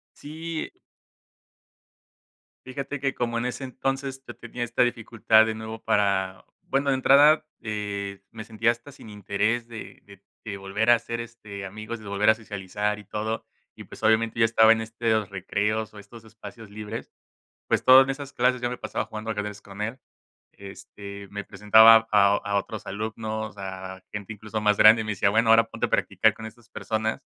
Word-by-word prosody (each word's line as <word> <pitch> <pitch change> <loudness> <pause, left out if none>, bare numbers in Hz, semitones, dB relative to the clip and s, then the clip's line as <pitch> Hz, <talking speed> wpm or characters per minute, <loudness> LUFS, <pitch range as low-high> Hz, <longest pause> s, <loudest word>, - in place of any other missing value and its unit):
Sí, 160 +2 -6
eh - - -15 1.9
Fíjate 140 +2 -5
que 135 -1 -1
como 115 -1 -2
en 120 - -2
ese 125 +2 -4
entonces 135 +1 -4
yo - - -8
tenía 120 - -5
esta 120 +1 0
dificultad 115 -2 +3
de 110 - -2
nuevo 110 0 -8
para 100 -3 0 0.3
bueno, 140 +1 +1
de 135 - +2
entrada, 145 +4 +5 0.2
eh, 100 -2 -4
me 110 -1 -9
sentía 110 +1 +1
hasta 120 +4 -13
sin 130 - -14
interés 105 +3 -1
de 115 -2 -10
de 100 -1 -17 0.2
de 105 -3 -5
volver 100 +3 -2
a - - +9
hacer, 115 0 -4
este, 110 -4 -8
amigos, 110 +4 -7
de 110 - -13
volver 100 +2 +3
a - - +5
socializar 105 -1 -4
y - - -15
todo 110 +3 -4 0.3
y, - - -11
pues, - - -13
obviamente 110 +1 +2
yo - - +6
estaba 110 0 +5
en 115 - 0
este 110 +1 -7
de 115 - +4
los 110 -3 -1
recreos, 105 +3 -2
o 105 - -13
estos 115 +3 -13
espacios 110 0 -12
libres, 105 0 -7 0.6
pues, - - +1
todo 130 +1 +9
en 135 - 0
esas 140 0 -5
clases 125 0 +1
yo 120 - -1
me 125 - -5
pasaba - - -4
jugando 110 +1 -7
ajedrez 105 -1 -4
con 100 0 -10
él. 115 +5 -3 0.5
Este, 100 0 -10
me 105 0 -6
presentaba 110 +3 +6
a 100 -1 +5
a 100 -1 -2
otros 100 +1 -5
alumnos, 110 +1 -4
o - - -21
sea, 95 -1 -7
a 95 - -22
gente, 105 +1 -6
incluso, 110 +1 -5
más 105 -1 +3
grande, 110 +1 +7
y - - -3
me 110 - -2
decía: 100 0 +1
"Bueno 110 +2 +2
ahora 115 0 +6
ponte - - -3
a - - -14
practicar 110 -1 +2
con 110 +1 -10
estas 115 +1 -13
personas". 110 0 -3
110 Hz, 195 wpm, -25 LUFS, 105-115 Hz, 1.9 s, a